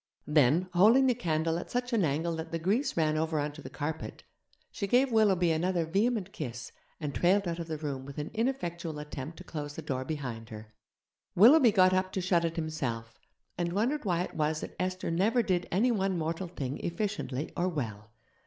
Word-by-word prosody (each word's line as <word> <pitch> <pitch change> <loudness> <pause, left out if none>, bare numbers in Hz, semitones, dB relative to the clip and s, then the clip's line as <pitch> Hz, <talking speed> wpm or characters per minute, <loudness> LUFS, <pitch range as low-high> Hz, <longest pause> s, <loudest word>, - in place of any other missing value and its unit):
Then, 150 +4 +3
holding 220 +9 +6
the 255 - +4
candle 165 -6 0
at - - -8
such 245 0 -2
an 220 -4 +3
angle 165 +3 0
that 160 0 -6
the 165 - -1
grease 215 - 0
ran 155 -1 +2
over 160 0 0
on 145 0 -1
to 150 +1 -11
the - - -8
carpet, 155 +1 -5 0.5
she 200 - -3
gave 250 +5 +3
Willoughby 195 -6 +4
another 170 +1 +1
vehement 200 +3 0
kiss 125 - -6 0.3
and 150 -3 -4
trailed 195 +2 +2
out 170 0 -3
of 165 - -5
the 160 -1 -3
room 140 -3 -4
with 140 +1 -10
an 150 0 -4
ineffectual 175 - -2
attempt 150 +1 -7
to - - -9
close 145 -4 -6
the - - -6
door 130 -1 -2
behind 125 -7 -5
her. 110 0 -10 0.6
Willoughby 240 - +7
got 185 -2 +5
up 185 0 +1
to - - -1
shut 175 -1 +2
it 165 0 -1
himself, 130 -9 -4 0.4
and 170 0 -1
wondered 245 +10 0
why 175 -4 +1
it - - -7
was 155 0 0
that - - -7
Esther 185 -1 -2
never 215 +8 +2
did 180 -4 0
any 225 +8 +3
one 195 -4 0
mortal 165 +3 -2
thing 140 -5 -5
efficiently 170 -7 -3
or 180 +1 +1
well. 110 - -5
170 Hz, 200 wpm, -30 LUFS, 150-195 Hz, 0.6 s, Willoughby